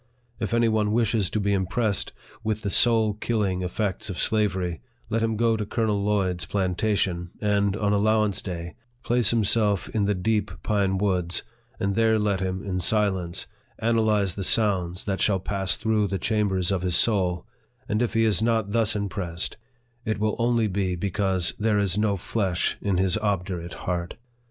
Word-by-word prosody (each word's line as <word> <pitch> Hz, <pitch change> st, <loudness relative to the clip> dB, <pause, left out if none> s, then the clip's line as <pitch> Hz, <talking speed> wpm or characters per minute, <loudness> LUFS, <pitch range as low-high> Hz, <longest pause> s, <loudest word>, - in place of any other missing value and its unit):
If 110 Hz, -, -2 dB
any 115 Hz, 0 st, +3 dB
one 110 Hz, -1 st, +1 dB
wishes 110 Hz, -4 st, +1 dB
to 110 Hz, -, -1 dB
be 100 Hz, 0 st, +1 dB
impressed 100 Hz, +2 st, 0 dB, 0.3 s
with 110 Hz, -1 st, -1 dB
the 100 Hz, -3 st, -2 dB
soul 110 Hz, -2 st, +4 dB
killing 105 Hz, -4 st, -1 dB
effects 95 Hz, +2 st, -2 dB
of 95 Hz, -, -5 dB
slavery, 95 Hz, -6 st, 0 dB, 0.3 s
let 115 Hz, +1 st, +1 dB
him 115 Hz, -1 st, 0 dB
go 115 Hz, 0 st, +2 dB
to 110 Hz, -, -2 dB
Colonel 105 Hz, -1 st, -1 dB
Lloyd's 95 Hz, -4 st, 0 dB
plantation, 95 Hz, -2 st, 0 dB
and, 100 Hz, -1 st, +1 dB
on 105 Hz, -1 st, +1 dB
allow 110 Hz, +1 st, +3 dB
ance 100 Hz, -3 st, -2 dB
day, 85 Hz, -2 st, -6 dB, 0.3 s
place 120 Hz, -3 st, +3 dB
himself 105 Hz, -3 st, +2 dB
in 105 Hz, -2 st, 0 dB
the 105 Hz, 0 st, +1 dB
deep 105 Hz, +2 st, 0 dB
pine 100 Hz, -3 st, +1 dB
woods, 90 Hz, -3 st, 0 dB, 0.4 s
and 100 Hz, 0 st, 0 dB
there 110 Hz, +1 st, +3 dB
let 105 Hz, -3 st, 0 dB
him, 95 Hz, 0 st, -3 dB
in 95 Hz, -2 st, -2 dB
silence, 95 Hz, -5 st, 0 dB, 0.3 s
analyze 110 Hz, -4 st, +1 dB
the 100 Hz, -, -4 dB
sounds 95 Hz, -4 st, +1 dB
that 100 Hz, -2 st, -2 dB
shall 100 Hz, -3 st, +3 dB
pass 95 Hz, 0 st, 0 dB
through 110 Hz, -2 st, +1 dB
the 95 Hz, 0 st, -2 dB
chambers 100 Hz, -2 st, 0 dB
of 95 Hz, -2 st, 0 dB
his 90 Hz, -2 st, +1 dB
soul, 90 Hz, -5 st, +2 dB, 0.4 s
and 105 Hz, +2 st, 0 dB
if 120 Hz, -1 st, -1 dB
he 115 Hz, 0 st, +3 dB
is 110 Hz, -1 st, +2 dB
not 110 Hz, -3 st, +1 dB
thus 115 Hz, -1 st, +2 dB
impressed, 95 Hz, -3 st, -2 dB, 0.5 s
it 110 Hz, -2 st, -1 dB
will 105 Hz, 0 st, 0 dB
only 120 Hz, -1 st, +2 dB
be 95 Hz, -2 st, -1 dB
because 95 Hz, -1 st, 0 dB
" -, -, -30 dB
there 105 Hz, -1 st, +2 dB
is 100 Hz, -3 st, +1 dB
no 105 Hz, -1 st, +1 dB
flesh 95 Hz, -1 st, -1 dB
in 100 Hz, -3 st, 0 dB
his 95 Hz, +3 st, +2 dB
obdurate 90 Hz, -4 st, -2 dB
heart." 85 Hz, -1 st, -2 dB
100 Hz, 175 wpm, -25 LUFS, 95-110 Hz, 0.5 s, soul